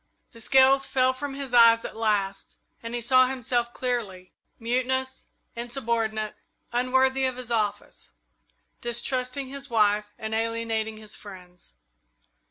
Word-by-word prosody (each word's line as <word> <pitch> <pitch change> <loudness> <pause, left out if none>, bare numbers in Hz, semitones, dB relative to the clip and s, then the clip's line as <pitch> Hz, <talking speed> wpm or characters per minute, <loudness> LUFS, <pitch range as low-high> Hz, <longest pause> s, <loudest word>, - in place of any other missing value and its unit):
The 230 - -13
scales 270 +3 +5
fell 260 0 +2
from 275 +1 -6
his 275 -2 -6
eyes 230 -1 +6
at - - -7
last, 205 -3 -1 0.3
and 230 +1 -5
he 240 - -3
saw 255 +2 +5
himself 245 -2 -1
clearly 220 -8 -4 0.2
mutinous, 255 +2 -1 0.3
insubordinate, 230 -3 -2 0.4
unworthy 260 +2 +2
of 255 -1 -1
his 250 -2 -7
office; 210 -3 -2 0.7
distrusting 255 +2 -2
his 280 +1 -8
wife 210 -2 +3
and 220 0 -5
alienating 225 -1 -2
his 215 -1 -8
friends. 180 -3 -12
235 Hz, 125 wpm, -26 LUFS, 220-260 Hz, 0.7 s, eyes